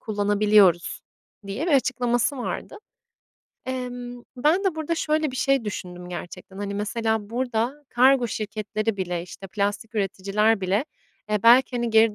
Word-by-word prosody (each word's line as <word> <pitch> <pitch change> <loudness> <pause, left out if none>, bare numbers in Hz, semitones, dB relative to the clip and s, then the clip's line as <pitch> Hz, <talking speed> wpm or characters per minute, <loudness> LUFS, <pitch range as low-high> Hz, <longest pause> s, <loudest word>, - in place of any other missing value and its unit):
kullanabiliyoruz." 205 -4 +3 0.5
diye 210 - -3
bir 340 - +1
açıklaması 245 -1 +1
vardı. 245 - -5 0.9
Emm, 245 -1 -5
ben 315 +10 +2
de 380 -4 +1
burada 315 +1 -2
şöyle 310 -2 0
bir 255 - -7
şey 275 -1 +2
düşündüm 180 -4 -6
gerçekten, 180 +2 -8
hani, 200 0 -4
mesela 220 0 -1
burada 245 +1 -1
kargo 250 0 +4
şirketleri 215 0 -3
bile, 180 -3 -2
işte, 180 +2 -10
plastik 205 +4 -2
üreticiler 200 +1 +1
bile, 195 +7 +1 0.5
eee, 210 -2 0
belki, 245 +2 +6
hani, 240 -1 -1
geri 220 -1 +5
220 Hz, 140 wpm, -24 LUFS, 200-250 Hz, 0.9 s, belki